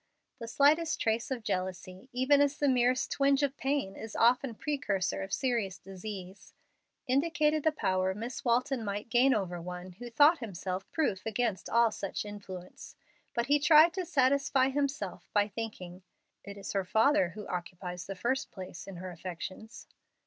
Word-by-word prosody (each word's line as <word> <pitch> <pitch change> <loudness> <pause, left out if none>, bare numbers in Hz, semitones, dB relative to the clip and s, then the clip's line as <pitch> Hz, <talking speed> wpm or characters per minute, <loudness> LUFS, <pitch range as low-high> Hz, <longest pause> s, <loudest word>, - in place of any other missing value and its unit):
The 230 - -6
slightest 310 +6 +3
trace 225 +1 0
of 255 -4 -3
jealousy, 185 +3 -4
even 260 +3 +3
as 285 0 +2
the 290 - +1
merest 255 -1 +2
twinge 275 0 +3
of 280 -1 0
pain 270 -9 -1
is 220 -1 -8
often 240 +1 +3
precursor 230 - -1
of 195 0 -6
serious 230 -7 -1
disease, 195 0 -9 0.5
indicated 300 +3 +2
the 315 - +3
power 185 -8 0
Miss 230 +5 -6
Walton 250 +1 +1
might 205 +2 -4
gain 250 +3 +4
over 180 -4 -2
one 180 +1 -7
who 240 +7 -9
thought 295 +7 +5
himself 190 -3 -5
proof 205 - -1
against 220 -3 -1
all 235 0 +4
such 200 0 -4
influence. 195 -3 -9 0.4
But 235 - +1
he 290 +3 +3
tried 310 +3 +7
to 375 0 -2
satisfy 270 -1 +3
himself 270 -9 -3
by 205 -1 +3
thinking, 195 -4 -7 0.4
"It 200 0 -9
is 195 - -6
her 195 -1 +1
father 220 - +3
who 210 +3 -9
occupies 180 0 -5
the 195 - -5
first 260 +8 -1
place 185 -1 -9
in 195 - -8
her 185 +1 -7
affections." 185 +6 -8
225 Hz, 165 wpm, -30 LUFS, 190-270 Hz, 0.5 s, tried